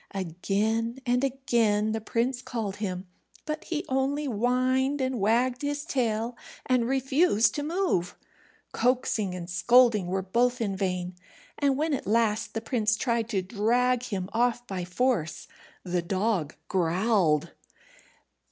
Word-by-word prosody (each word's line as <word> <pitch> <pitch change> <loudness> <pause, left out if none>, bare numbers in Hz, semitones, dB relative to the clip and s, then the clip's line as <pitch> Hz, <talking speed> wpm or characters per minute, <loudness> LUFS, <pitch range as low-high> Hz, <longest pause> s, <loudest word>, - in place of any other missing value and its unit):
Again 210 +6 -1
and 245 +1 +1
again 235 -6 +1
the 220 0 -2
prince 240 +3 -1
called 225 -6 -4
him, 190 -3 -4 0.4
but 305 0 -4
he 325 +1 -3
only 270 +3 0
whined 255 +3 +1
and 260 -2 -1
wagged 245 +5 +2
his 290 0 -2
tail, 235 -6 -1 0.3
and 250 -2 +2
refused 265 - +2
to 295 - -2
move. 310 - -1 0.6
Coaxing 230 -6 0
and 175 -1 -6
scolding 215 +2 +4
were 190 +1 -1
both 240 +6 +1
in 205 -4 -1
vain, 180 -2 -2 0.5
and 280 -2 +2
when 310 +1 0
at 270 - -3
last 225 0 +1
the 225 - -1
prince 225 -2 0
tried 235 -2 0
to 190 -3 0
drag 235 +5 +1
him 195 -7 -4
off 240 +1 +1
by 185 -5 -4
force, 180 -4 -1 0.4
the 180 -1 -1
dog 185 -3 -1
growled. 175 -3 +1
230 Hz, 135 wpm, -27 LUFS, 195-255 Hz, 0.6 s, scolding